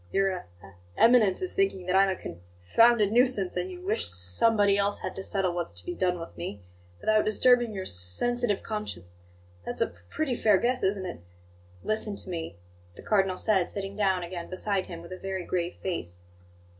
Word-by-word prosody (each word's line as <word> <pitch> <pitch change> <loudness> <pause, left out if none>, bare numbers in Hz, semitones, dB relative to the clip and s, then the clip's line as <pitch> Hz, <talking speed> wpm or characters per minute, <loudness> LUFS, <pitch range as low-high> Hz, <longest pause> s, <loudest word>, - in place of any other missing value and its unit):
Your 195 0 +2
E 180 - -5 0.6
eminence 230 - +5
is 370 - -2
thinking 390 - 0
that 185 +1 0
I'm 195 0 +5
a 190 - 0
conf 85 - -8 0.2
founded 210 - +4
nuisance, 240 -6 +2
and 180 +1 -2
you 180 -1 -9
wish 215 +3 0
s - - -2
somebody 200 - +3
else 200 0 0
had - - -4
to 190 - -5
settle 190 -3 -1
what's 175 -1 -3
to - - -7
be 355 - -3
done 180 - 0
with 165 - -9
me, 100 - -6 0.4
without 215 0 +3
disturbing 240 +2 +4
your 190 -2 -4
s - - -6
sensitive 205 - -1
conscience. 90 - -6 0.4
That's - - -5
a - - +2
p 85 - -20
pretty 310 -5 -1
fair 215 -4 +4
guess, 250 +5 0
isn't 190 0 0
it?" 175 - -6 0.6
"Listen 215 -1 -1
to 190 - -5
me," 165 - -5 0.4
the - - -12
Cardinal 195 -3 +2
said, 195 -4 +2
sitting 195 0 -4
down 190 -3 +1
again 175 0 -6
beside 190 +1 -1
him, 170 -1 -8
with 170 - -12
a 185 - -7
very 190 -2 -4
grave 175 -1 -2
face. 90 - -4
195 Hz, 200 wpm, -28 LUFS, 175-215 Hz, 0.6 s, eminence